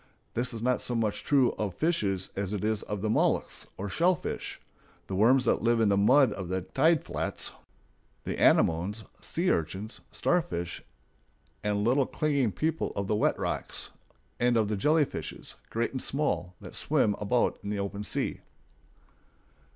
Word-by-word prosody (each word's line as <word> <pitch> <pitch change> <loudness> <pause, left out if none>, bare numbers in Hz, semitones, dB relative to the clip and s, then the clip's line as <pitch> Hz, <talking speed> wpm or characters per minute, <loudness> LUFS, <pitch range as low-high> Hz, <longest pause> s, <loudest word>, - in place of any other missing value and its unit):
This 125 +2 -1
is 115 -2 -6
not 125 0 +2
so 120 - -2
much 110 -3 -1
true 135 -4 +4
of 100 -4 -2
fishes 100 - 0
as 100 0 -2
it 105 - -2
is 110 -1 +1
of 105 -1 -5
the 110 - +1
mollusks - - +1
or 100 - -4
"shell 175 - +3
fish," - - -5 0.5
the - - -6
worms 125 +7 +4
that - - +2
live 115 +1 +3
in 110 -2 +4
the 100 - +4
mud 125 +4 +5
of 95 -4 -6
the 95 0 -1
tide 155 - +2
flats, - - -2 0.7
the - - -4
anemones, 95 +7 +3 0.2
sea 175 +3 0
urchins, 95 +7 -3
starfish 90 - -1 0.8
and 105 -1 0
little 130 +4 +3
clinging 140 -7 +1
people 160 +8 -1
of 100 - -1
the 105 - 0
wet - - +2
rocks, - - -3 0.5
and 120 0 +3
of 110 -2 +2
the 105 - 0
jellyfishes, 150 +8 0 0.2
great 115 +1 -1
and 130 - -4
small, 90 - -1
that - - -10
swim 105 - +2
about 105 +4 +1
in 100 - -4
the 105 - -1
open 100 +1 -3
sea. - - -2
110 Hz, 165 wpm, -29 LUFS, 100-130 Hz, 0.8 s, mud